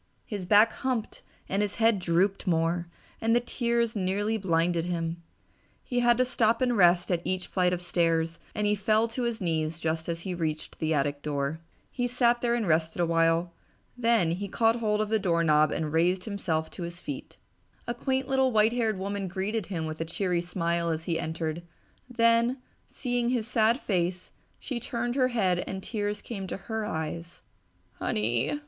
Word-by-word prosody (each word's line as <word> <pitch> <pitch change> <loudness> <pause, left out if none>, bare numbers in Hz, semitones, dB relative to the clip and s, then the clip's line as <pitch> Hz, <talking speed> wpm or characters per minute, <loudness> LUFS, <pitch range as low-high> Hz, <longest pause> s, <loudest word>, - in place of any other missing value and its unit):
His 200 -4 -5
back 215 +3 +6
humped 250 -4 -3 0.3
and 195 +2 0
his 205 -1 -1
head 225 -2 +3
drooped 185 +3 +1
more, 170 0 +1 0.3
and 225 +1 +3
the - - +5
tears 235 -1 0
nearly 205 +3 0
blinded 170 -4 +1
him. 170 -1 -3 0.6
He 245 -2 -1
had 240 -1 +4
to 255 - +3
stop 230 -2 +2
and 245 -2 +2
rest 175 -2 +4
at 170 -2 +1
each 185 0 -1
flight 180 -1 +1
of 180 0 -2
stairs 165 -1 +1 0.2
and 210 - 0
he 205 - +3
fell 215 +2 +2
to 235 +3 -4
his 235 -2 -1
knees 160 -2 -1
just 160 0 -2
as 165 0 -2
he 185 +1 -4
reached 160 -3 -3
the 160 0 0
attic 145 -1 0
door. 145 +1 -2 0.3
He 245 -1 -1
sat 240 -1 +2
there 235 -1 +2
and 235 -3 -1
rested 160 +1 +1
awhile, 165 0 +2 0.4
then 230 -9 +2
caught 225 +3 +2
hold 215 -2 +1
of 215 - -1
the 220 0 +2
doorknob 165 -5 +3
and 155 -1 -2
raised 180 +3 +2
himself 165 -7 -2
to - - -9
his 170 0 -5
feet. 285 +6 -7 0.5
A 240 - -2
quaint 260 +2 -1
little 265 -1 +2
white 220 0 +4
haired 225 -4 0
woman 200 +1 -3
greeted 195 +3 -2
him 165 -5 -3
with 155 0 -5
a - - -1
cheery 175 +1 -1
smile 170 -1 -1
as 160 0 -2
he 165 -1 -1
entered, 160 0 -3 0.5
then, 230 +1 +3 0.3
seeing 245 -2 -1
his 240 -3 0
sad 230 +1 +3
face, 180 -4 -1 0.3
she 255 -4 -4
turned 240 0 -2
her 255 -1 +3
head 190 -8 +1
and 190 0 -5
tears 210 -2 -3
came 195 -5 -5
to - - -4
her 220 +1 -4
eyes. 160 +2 -5 0.6
"Honey!" 115 - 0
190 Hz, 180 wpm, -28 LUFS, 165-230 Hz, 0.6 s, back